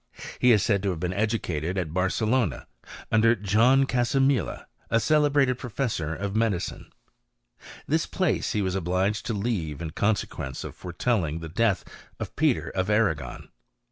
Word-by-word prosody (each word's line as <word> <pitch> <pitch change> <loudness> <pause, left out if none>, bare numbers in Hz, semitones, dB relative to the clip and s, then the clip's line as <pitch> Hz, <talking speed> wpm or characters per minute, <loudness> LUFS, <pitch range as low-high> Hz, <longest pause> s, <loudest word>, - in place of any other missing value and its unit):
He 125 - +5
is 105 -4 +4
said 100 -3 +2
to 100 - 0
have 90 -4 -3
been 90 +2 -2
educated 95 -5 -1
at 85 -4 -2
Barcelona, 100 - 0 0.5
under 115 +1 +5
John 115 +7 +4
Casamila, 130 - +1 0.2
a 115 - +3
celebrated 145 -2 +3
professor 105 - -2
of 100 +3 -4
medi 110 -4 +2
cine. - - -6 1.0
This 160 +2 0
place 185 -9 0
he 105 -3 0
was 95 -1 -1
obliged 95 +3 0
to 115 - -1
leave, 95 - -2
in 80 -2 -5
consequence 100 - -2
of - - -7
foretelling 90 -3 -1
the 80 -1 -7
death 105 +2 +1 0.3
of - - -6
Peter - - +1
of 95 +1 -1
Arragon. 80 - 0
105 Hz, 150 wpm, -26 LUFS, 90-120 Hz, 1.0 s, He